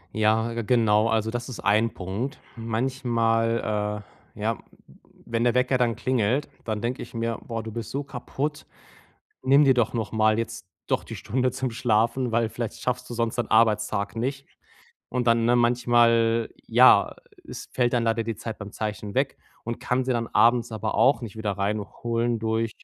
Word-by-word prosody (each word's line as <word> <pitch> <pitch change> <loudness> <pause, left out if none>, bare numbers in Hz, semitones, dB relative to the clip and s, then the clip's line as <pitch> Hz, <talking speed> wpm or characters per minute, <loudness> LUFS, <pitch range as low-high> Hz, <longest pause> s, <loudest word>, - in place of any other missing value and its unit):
Ja, 110 +2 +2
genau, 110 -2 +3
also 110 0 0
das 120 0 -4
ist 130 - -7
1 110 +2 +2
Punkt. 100 +9 -4 0.2
Manchmal, 115 -3 0 0.3
äh, - - -10
ja, - - 0
w - - -18 0.7
wenn 115 +1 +1
der 120 - +3
Wecker 125 +1 +2
dann 120 -3 +1
klingelt, 130 +3 0 0.2
dann 110 -2 -2
denke 120 +2 -2
ich - - -9
mir: 115 0 -2
„Boah, 115 -1 -4
du 110 - -7
bist 115 -1 -6
so 140 +1 -2
kaputt. 140 +3 -4 0.8
Nimm 140 +3 +5
dir 135 -1 +5
doch 120 -3 +1
nochmal 110 -1 +1
jetzt 110 -3 -4 0.2
doch - - 0
die - - -8
Stunde 130 +3 -1
zum 130 0 -3
Schlafen, 115 +2 +1
weil 115 0 +1
vielleicht 115 0 -5
schaffst 125 0 -3
du 120 - -4
sonst 115 0 -1
deinen 120 - -1
Arbeitstag 110 -2 +2
nicht.“ 135 +4 -3 0.6
Und 125 -1 -2
dann, 115 0 +3
ne, 120 +1 +4
manchmal 120 -1 +3 0.2
ja, - - +5 0.3
es - - -7
fällt 120 -1 +1
dann 120 -1 +1
leider 115 0 +1
die 115 -2 -3
Zeit 115 -1 -6
beim 100 0 -8
Zeichen 105 -2 -4
weg - - +1 0.3
und 120 0 -4
kann 125 +1 0
sie 130 - 0
dann 115 -1 -1
abends 120 0 +3
aber 110 0 -3
auch 130 -2 +4
nicht 110 -2 -7
wieder 105 -2 -2
reinholen 110 +4 -2
durch 110 0 -1
115 Hz, 180 wpm, -25 LUFS, 110-120 Hz, 0.8 s, Nimm